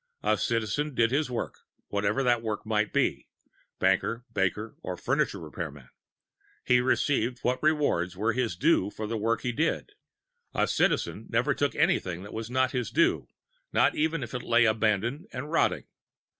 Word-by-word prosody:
A - - +3
Citizen 120 +5 -1
did 115 0 +3
his 145 +1 +1
work, 120 - -4 0.3
whatever 100 +6 0
that 120 -2 +3
work 110 -2 -3
might 110 -1 0
be - - 0 0.5
banker, 95 +5 +1
baker 105 +4 -1
or - - -5
furniture - - 0
repairman. 75 -4 -7 0.8
He 125 0 +4
received 125 -1 +1
what 125 +1 0
rewards 145 - +1
were 110 +3 +1
his 120 -6 -1
due 120 - +3
for 110 +1 -6
the 115 +2 -3
work 115 +1 0
he 125 - -1
did. 160 - -1 0.6
A - - +3
Citizen - - 0
never - - +2
took 145 -4 -1
anything 90 0 +1
that 100 - -10
was 110 0 -5
not 130 +1 +1
his 125 -2 -2
due 335 0 +2 0.5
not - - +4
even 160 -1 0
if 120 - -8
it 125 - -3
lay 120 0 +4
abandoned 110 - +1
and 145 +4 -6
rotting. 165 - +1
115 Hz, 165 wpm, -28 LUFS, 105-130 Hz, 0.8 s, He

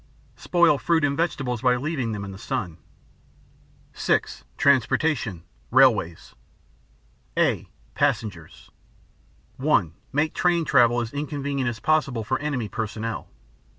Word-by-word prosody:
Spoil 170 -5 +3
fruit 165 -2 +1
and 140 -1 0
vegetables 135 -7 -1
by 125 -1 +3
leaving 130 -3 -2
them 100 -2 -4
in 100 - -7
the 95 - -10
sun. 105 - -4 1.1
(6) - - -1
Transportation: 135 - +1 0.3
Railways 85 0 +3 1.0
(a) - - +1 0.2
Passengers 110 - -2 0.9
(1.) 120 - +2 0.2
Make 150 +3 0
train 170 -2 +1
travel 120 -4 +4
as 115 -1 -5
inconvenient 140 -3 -2
as 115 -2 -6
possible 140 -6 +1
for 130 +4 -1
enemy 140 -7 -2
personnel. 110 +1 -4
130 Hz, 115 wpm, -24 LUFS, 110-145 Hz, 1.1 s, travel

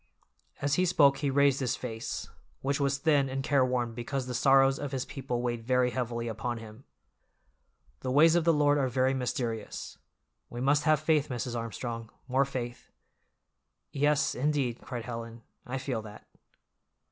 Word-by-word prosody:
As 145 0 +1
he - - +3
spoke 140 -5 +5
he 145 -1 0
raised 140 0 +3
his 130 -1 0
face, 115 -3 -5 0.4
which 140 +1 0
was 140 -1 +1
thin 140 -2 +2
and 135 +1 -3
careworn 130 -4 +1
because 125 +3 -3
the 125 - -5
sorrows 135 +2 +4
of 145 -2 -4
his 130 -2 -2
people 125 -3 -4
weighed 120 -2 -2
very 125 +1 +2
heavily 120 -2 -3
upon 115 +2 -3
him. 110 +3 -11 1.1
"The 130 - -4
ways 155 +5 +6
of 175 -1 +3
the 165 - +4
Lord 145 -1 +3
are 135 - +2
very 130 +1 +1
mysterious. 120 -4 -4 0.5
We 120 - -7
must 140 +4 +2
have 155 -2 +4
faith, 155 -1 +2
Mrs. 125 -1 -3
Armstrong, 115 0 -5 0.2
more 130 +2 +2
faith." 120 -3 -6 1.0
"Yes, 145 +1 +2
indeed," 135 -3 -1
cried 120 -3 -6
Helen, 115 -1 -7 0.2
"I 130 +2 -3
feel 130 -4 -3
that." 105 -1 -12
130 Hz, 160 wpm, -29 LUFS, 120-140 Hz, 1.1 s, ways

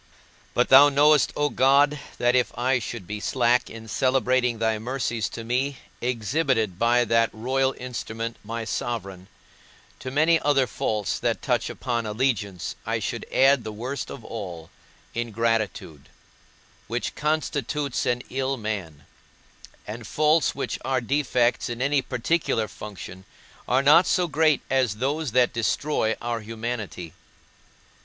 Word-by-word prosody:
But 125 - +2
thou 140 +2 +9
knowest, 145 0 +4
O 145 0 +1
God, 140 +2 +4 0.2
that 120 +1 +2
if 125 -1 +2
I 125 +1 +2
should 110 -2 -6
be 105 +4 -5
slack 125 +3 +1
in 115 0 -10
celebrating 130 0 +1
thy 110 -1 0
mercies 120 -2 -2
to 115 - -7
me 130 +4 -1 0.2
exhibited 120 - 0
by 120 +1 +3
that 115 0 +3
royal 130 +4 0
instrument, 115 -2 -5
my 115 +1 -5
sovereign, 95 -6 -4 0.7
to 130 - -6
many 160 +5 +3
other 145 -2 +3
faults 105 -2 -2
that - - -1
touch - - 0
upon 120 -3 -3
allegiance 105 -6 -1
I - - -1
should - - -4
add 135 -2 +4
the 110 - -5
worst 125 +5 -5
of - - -9
all, 90 -6 -7 0.4
ingratitude, 115 -9 -2 0.8
which 120 +2 -3
constitutes 150 -2 -1
an 125 0 0
ill 135 +1 -1
man; 95 - -5 0.8
and 110 +1 -7
faults 155 +2 +2
which 140 - -3
are 130 -1 +1
defects 125 -2 +1
in 120 0 -5
any 140 +2 +2
particular 125 -3 0
function 95 -3 -9 0.4
are 130 +2 +2
not 155 +5 +6
so 180 -1 +2
great 155 -1 +2
as 130 -6 +1
those 135 +3 -2
that 125 -1 +3
destroy 115 0 0
our 120 -1 -2
humanity. 110 -6 -5
120 Hz, 135 wpm, -25 LUFS, 110-135 Hz, 0.8 s, thou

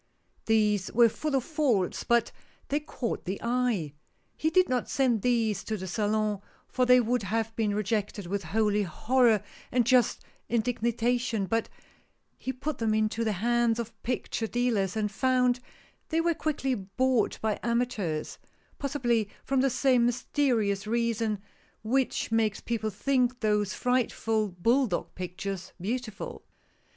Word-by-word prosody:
These 210 -3 +2
were 235 0 +6
full 300 +5 -2
of 265 - +1
faults, 255 - 0
but 235 -1 +2 0.4
they 290 - +1
caught 275 -5 -4
the 190 +3 -3
eye. 235 - 0 0.4
He 315 - 0
did 370 +3 +4
not 250 -1 -1
send 250 -6 +2
these 225 -4 +1
to 220 - -2
the 190 - -6
Salon, 210 +1 0 0.3
for 255 -1 0
they 250 0 +7
would 245 +1 +1
have 225 +2 -2
been 210 -3 0
rejected 210 -1 -1
with 195 +1 -3
holy 210 +4 +1
horror 220 +4 +2 0.3
and 245 -2 +2
just 250 -1 +3 0.3
indignation, 235 -1 0
but 225 +3 -1 0.7
he 260 - -3
put 270 +3 -4
them 220 -2 +1
into 215 +1 +1
the 220 -2 0
hands 240 -1 +3
of 235 -1 -4
picture 235 -2 -2
dealers, 220 -5 0
and 210 -1 0
found 250 +1 +2 0.5
they 325 - +1
were 340 +1 +2
quickly 290 -4 -1
bought 235 +4 0
by 220 -1 -1
amateurs, 235 -10 -1 0.4
possibly 240 -7 0
from 270 -1 +1
the 270 - +3
same 250 -1 +3
mysterious 230 -5 0
reason 230 -2 0 0.4
which 255 +1 0
makes 220 -2 +1
people 225 -2 -2
think 250 +3 +1
those 210 -3 +1
frightful 225 -3 +1
bull 230 +9 +2
dog 175 -5 -3
pictures 185 +1 -5
beautiful. 215 +2 -4
230 Hz, 140 wpm, -28 LUFS, 210-250 Hz, 0.7 s, they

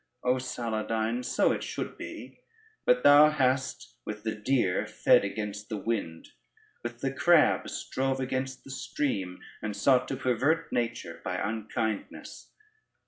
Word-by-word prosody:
O 125 +1 +3
Saladyne, 115 -1 -2
so 120 - +2
it - - -2
should - - -4
be; - - -9 0.5
but 125 0 +4
thou 145 +1 +8
hast 130 - -1
with 105 0 -6
the 110 -1 -1
deer 110 -3 +1
fed - - +4
against 105 +1 -4
the 110 - -3
wind, 100 -7 -3 0.5
with 120 0 -6
the 135 0 -1
crab 155 +3 +4
strove 135 0 -2
against 130 0 -3
the 135 - -10
stream, 100 -9 -3 0.2
and 105 -1 -3
sought 125 +3 +3
to - - -2
pervert 135 +7 +1
nature 105 -9 -2
by 90 -1 -2
unkindness. 110 +1 -4
120 Hz, 140 wpm, -29 LUFS, 105-130 Hz, 0.5 s, thou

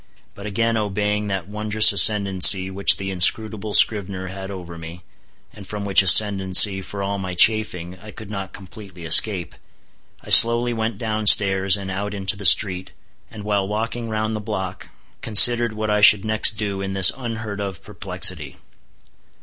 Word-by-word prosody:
But 100 +1 -12
again 115 +2 -4
obeying 105 0 -5
that 95 -3 -7
wondrous 105 +1 +2
ascendancy 95 -1 +3
which 100 +1 +1
the 95 0 -7
inscrutable 105 +3 +1
scrivener 95 -3 +1
had 95 0 -11
over 90 -3 -11
me, 85 +2 -13 0.5
and 100 -2 -15
from 105 -1 -9
which 100 -1 +3
ascendancy, 95 0 +4
for 100 +1 -10
all 100 0 -6
my 90 -1 -8
chafing, 90 -4 -1
I 105 - -16
could 105 0 -14
not 95 -2 -9
completely 95 -2 -15
escape, 85 +2 0 0.7
I - - -12
slowly 120 +1 +5
went 110 -2 -6
down 110 -1 -6
stairs 95 -1 +3
and 95 -1 -10
out 100 +2 -7
into 95 -1 -4
the 100 0 -11
street, 95 0 +1 0.4
and 110 -4 -13
while 100 -2 -4
walking 115 +3 -7
round 110 0 -5
the - - -7
block, 95 -4 -9 0.3
considered 120 +1 +4
what 110 0 -6
I 105 0 -2
should 105 -1 +4
next 110 0 -2
do 100 -3 -6
in 95 0 -7
this 95 -1 +5
unheard 110 -5 -9
of 95 -4 -9
perplexity. - - -4
100 Hz, 165 wpm, -18 LUFS, 95-110 Hz, 0.7 s, slowly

